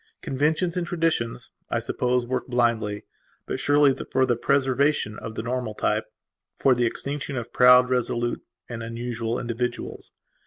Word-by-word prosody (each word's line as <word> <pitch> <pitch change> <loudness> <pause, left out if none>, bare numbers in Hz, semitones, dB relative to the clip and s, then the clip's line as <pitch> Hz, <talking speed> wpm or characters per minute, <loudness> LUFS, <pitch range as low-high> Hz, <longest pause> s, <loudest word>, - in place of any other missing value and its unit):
Conventions 155 +6 0
and 175 -2 -2
traditions, 165 -9 -1 0.2
I - - 0
suppose, 125 0 0
work 130 +1 -2
blindly 115 -4 0 0.4
but - - -3
surely 145 -1 +4 0.2
for 130 - +3
the 120 - +1
preservation 135 -2 +1
of 110 - -7
the - - -3
normal 120 -2 -3
type; - - 0 0.5
for 135 - +4
the 120 -1 +2
extinction 140 +2 -4
of 120 0 -6
proud, 125 0 +7
resolute 120 -1 -1 0.3
and 120 -1 -6
unusual 115 0 -3
individuals. 120 +1 -4
125 Hz, 145 wpm, -25 LUFS, 120-135 Hz, 0.5 s, proud